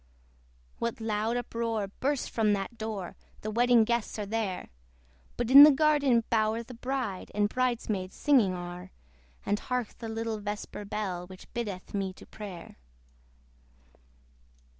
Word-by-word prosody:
What 235 0 -2
loud 220 +1 -1
uproar 230 -3 -2
bursts 270 +7 -2
from 215 -2 +2
that 200 +3 -3
door! 215 -5 -5 0.3
The 215 - -4
wedding 240 +1 +5
guests 235 0 -1
are 210 - -3
there: 205 -3 -3 0.7
But 240 0 -1
in 275 +2 +12
the 295 - +12
garden 285 -5 +3
bower 220 0 +2
the 250 - -11
bride 250 -5 -3
And 205 0 +3
bride 250 +1 -1
maids 190 -3 -3
singing 235 -11 +3
are: 175 +1 -7 0.6
And 205 - +1
hark 250 -3 -3
the 225 - -5
little 225 -1 -3
vesper 205 0 -5
bell, 190 -4 -3
Which 185 0 -13
biddeth 210 -6 -5
me 195 -2 -2
to - - -14
prayer! 200 -5 -9
220 Hz, 140 wpm, -29 LUFS, 200-240 Hz, 0.7 s, in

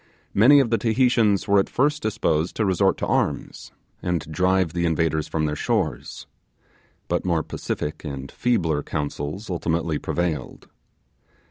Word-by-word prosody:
Many 130 +8 +7
of 125 -4 +1
the 115 - +2
Tahitians 115 -4 +2
were 100 0 +5
at 95 - 0
first 150 +3 +1
disposed 90 - 0
to 110 - 0
resort 95 -3 +2
to - - -2
arms, - - -2 0.3
and 90 -2 -1
drive 90 0 +1
the 85 0 0
invaders 80 -1 0
from 80 -1 -1
their 75 0 -1
shores; - - -2 0.8
but - - -1
more 85 -3 0
pacific 75 - -4
and 70 -3 -6
feebler 85 -12 0
counsels 75 +6 -4
ultimately 85 -3 -1
prevailed. 85 -3 -3
90 Hz, 140 wpm, -23 LUFS, 80-110 Hz, 0.8 s, Many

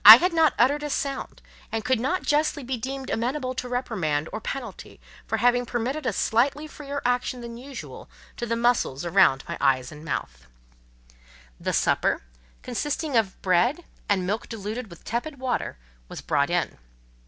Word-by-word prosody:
I 215 +2 +15
had 355 +8 +1
not 320 -3 +4
uttered 285 +5 +4
a 295 - -3
sound, 275 -1 -3 0.3
and 225 -1 -2
could 255 -2 +2
not 305 +10 0
justly 295 -1 +1
be 255 +1 -2
deemed 265 +3 -5
amenable 255 +3 -1
to 250 -1 -4
reprimand 180 - -1
or 215 - -3
penalty 235 -4 -6 0.3
for - - 0
having 245 0 +3
permitted 255 +4 -2
a - - +3
slightly 265 +9 +1
freer 285 -2 -6
action 245 0 0
than 235 0 -7
usual 265 +3 -9 0.3
to 240 - -3
the 230 - +1
muscles 230 - +1
about 165 -7 +4
my - - -5
eyes 130 -2 +2
and 150 0 -11
mouth. 65 - -4 1.1
The - - -1
supper, - - +2 0.4
consisting 295 +3 -2
of 220 -5 +2
bread, 235 - +2 0.2
and 190 -3 +2
milk 210 +5 -2
diluted 220 +1 -5
with 170 - -13
tepid 260 +6 -3
water, 255 - -2 0.3
was - - -7
brought - - +1
in. - - -1
245 Hz, 165 wpm, -26 LUFS, 210-275 Hz, 1.1 s, I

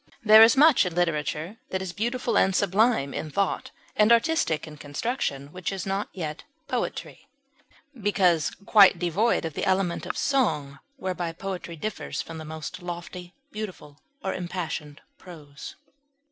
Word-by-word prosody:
There 215 0 +9
is 225 +3 +7
much 300 -1 +6
in 180 -3 -4
literature 165 +2 -1
that 190 - -2
is 185 -2 -5
beautiful 240 +2 -1
and 190 -1 +3
sublime 200 - +2
in 155 - -4
thought 195 +5 -1 0.3
and 210 +2 +4
artistic 235 - +2
in 155 -1 -11
construction, 145 - -3
which 185 0 -3
is 195 -1 -4
yet 195 +1 -2
not 155 -3 -5 0.2
poetry, - - -4 0.7
because 190 - +2 0.2
quite 200 -4 +7
devoid 180 +5 +1
of 160 - -4
the - - -4
element 190 -2 0
of - - -4
song, 150 - 0 0.2
whereby 180 -7 -3
poetry 180 -1 -6
differs 215 +6 -5
from 165 -1 -6
the 155 - -8
most 160 +4 -7
lofty, 175 +1 -7 0.2
beautiful, 185 -9 -8 0.2
or 190 - -1
impassioned 170 -5 -5 0.2
prose. 150 -6 -11
180 Hz, 145 wpm, -26 LUFS, 160-210 Hz, 0.7 s, There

